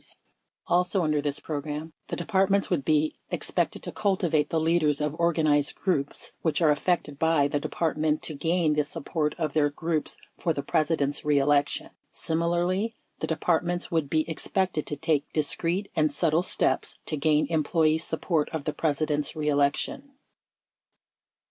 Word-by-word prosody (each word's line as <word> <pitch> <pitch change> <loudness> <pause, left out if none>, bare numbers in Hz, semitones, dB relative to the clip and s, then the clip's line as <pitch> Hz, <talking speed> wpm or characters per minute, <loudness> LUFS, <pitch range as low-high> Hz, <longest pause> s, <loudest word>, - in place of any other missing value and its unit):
sfc - - -10 0.5
Also, 180 +1 +2
under 150 -2 +1
this 145 -1 -2
program, 150 +1 -5
the - - -3
Departments 195 +2 +1
would 160 -6 +1
be 155 +1 +2 0.2
ex - - -2
pected - - 0
to - - -5
cultivate 180 -8 +1
the 165 - +1
leaders 160 -2 +2
of 150 -1 -1
organized 155 -4 +2
groups 145 -7 -2
which 160 - 0
are 160 -3 +4
affected 150 -2 0
by 160 -3 +3
the 145 0 -1
Department 155 0 -1
to 155 - -3
gain 165 +1 +1
the 150 0 +2
support 150 0 -2
of 155 -4 -2
their 150 -2 +3
groups 160 +1 -2 0.2
for 165 - +1
the 140 - -4
President's 150 -3 0
reelection. 145 -1 +2 0.2
Similarly, 175 +6 -1 0.2
the - - -2
Depart 165 +1 +1
ments 175 0 -3
would 160 -4 0
be 155 +1 +1
expected 170 0 -1
to 150 - -2
take 145 0 0
discreet 170 +6 0
and 155 -2 +2
subtle 160 +2 +2
steps 185 - +1
to 155 - -2
gain 150 +1 +2
employee 155 0 +2
support 160 -1 -1
of 160 -3 -4
the 150 - -2
President's 150 -1 0
reelection. 150 - 0
155 Hz, 155 wpm, -27 LUFS, 150-170 Hz, 0.5 s, are